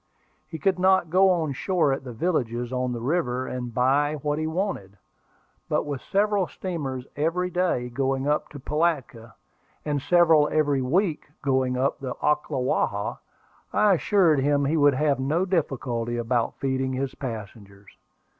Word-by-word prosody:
He 160 Hz, -, -7 dB
could 190 Hz, +2 st, +1 dB
not 185 Hz, -3 st, +3 dB
go 190 Hz, +2 st, +5 dB
on 165 Hz, -6 st, +1 dB
shore 165 Hz, -1 st, +1 dB
at 135 Hz, -, -4 dB
the 125 Hz, -, -7 dB
villages 120 Hz, -3 st, -2 dB
on 125 Hz, 0 st, -1 dB
the 120 Hz, -, -3 dB
river, 130 Hz, -2 st, -1 dB
and 125 Hz, -2 st, -5 dB
buy 140 Hz, +5 st, +2 dB
what 150 Hz, 0 st, 0 dB
he 155 Hz, -, -1 dB
wanted; 160 Hz, -, -3 dB, 0.7 s
but -, -, +1 dB
with 145 Hz, -4 st, -5 dB
several 200 Hz, -2 st, +1 dB
steamers 140 Hz, -10 st, -5 dB
every 170 Hz, +5 st, -1 dB
day 175 Hz, -9 st, 0 dB
going 135 Hz, +2 st, -1 dB
up 150 Hz, +1 st, 0 dB
to 145 Hz, -, -10 dB
Pilatka, 135 Hz, -6 st, -2 dB, 0.5 s
and 145 Hz, -2 st, -1 dB
several 165 Hz, -2 st, +4 dB
every 145 Hz, -3 st, +2 dB
week 160 Hz, +5 st, 0 dB, 0.2 s
going 130 Hz, -2 st, +1 dB
up 135 Hz, +2 st, 0 dB
the 130 Hz, -2 st, -5 dB
Ocklawaha, 135 Hz, -8 st, -1 dB, 0.5 s
I 210 Hz, -2 st, +4 dB
assured 175 Hz, -4 st, +3 dB
him 140 Hz, +1 st, +2 dB
he 150 Hz, +4 st, +1 dB
would 145 Hz, -3 st, +4 dB
have 145 Hz, -1 st, +1 dB
no 155 Hz, +8 st, 0 dB
difficulty 125 Hz, -9 st, -1 dB
about 120 Hz, 0 st, 0 dB
feeding 130 Hz, -1 st, -1 dB
his 130 Hz, 0 st, -2 dB
passengers. 100 Hz, -5 st, -8 dB
140 Hz, 155 wpm, -25 LUFS, 125-165 Hz, 0.7 s, go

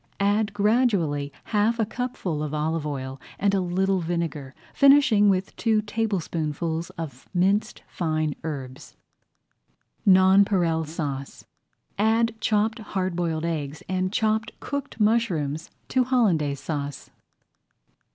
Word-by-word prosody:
Add 205 Hz, +1 st, +2 dB
gradually 200 Hz, -, +1 dB
half 220 Hz, +2 st, +1 dB
a 225 Hz, -, +1 dB
cupful 210 Hz, -9 st, -3 dB
of 150 Hz, 0 st, -3 dB
olive 155 Hz, 0 st, -1 dB
oil 135 Hz, -2 st, -5 dB, 0.2 s
and 200 Hz, 0 st, +1 dB
a 195 Hz, -, +2 dB
little 190 Hz, +2 st, +1 dB
vinegar, 165 Hz, -5 st, -3 dB, 0.2 s
finishing 275 Hz, -7 st, +6 dB
with 190 Hz, 0 st, 0 dB
two 220 Hz, -2 st, +2 dB
tablespoonfuls 170 Hz, -6 st, -2 dB
of 140 Hz, -6 st, -7 dB
minced 200 Hz, +4 st, +1 dB
fine 155 Hz, -3 st, -1 dB
herbs. 135 Hz, -4 st, -7 dB, 1.1 s
NONPAREIL 185 Hz, -3 st, +4 dB
SAUCE 145 Hz, -4 st, -5 dB, 0.5 s
Add 225 Hz, +2 st, +3 dB
chopped 220 Hz, +2 st, +1 dB
hard 190 Hz, -4 st, -3 dB
boiled 165 Hz, -2 st, -1 dB
eggs 150 Hz, -3 st, -3 dB
and 185 Hz, 0 st, -1 dB
chopped 220 Hz, +1 st, 0 dB
cooked 280 Hz, -4 st, -5 dB
mushrooms 180 Hz, -9 st, +1 dB, 0.2 s
to 255 Hz, -, +3 dB
Hollandaise 175 Hz, -, +2 dB
Sauce. 145 Hz, -3 st, -5 dB
185 Hz, 110 wpm, -25 LUFS, 155-215 Hz, 1.1 s, finishing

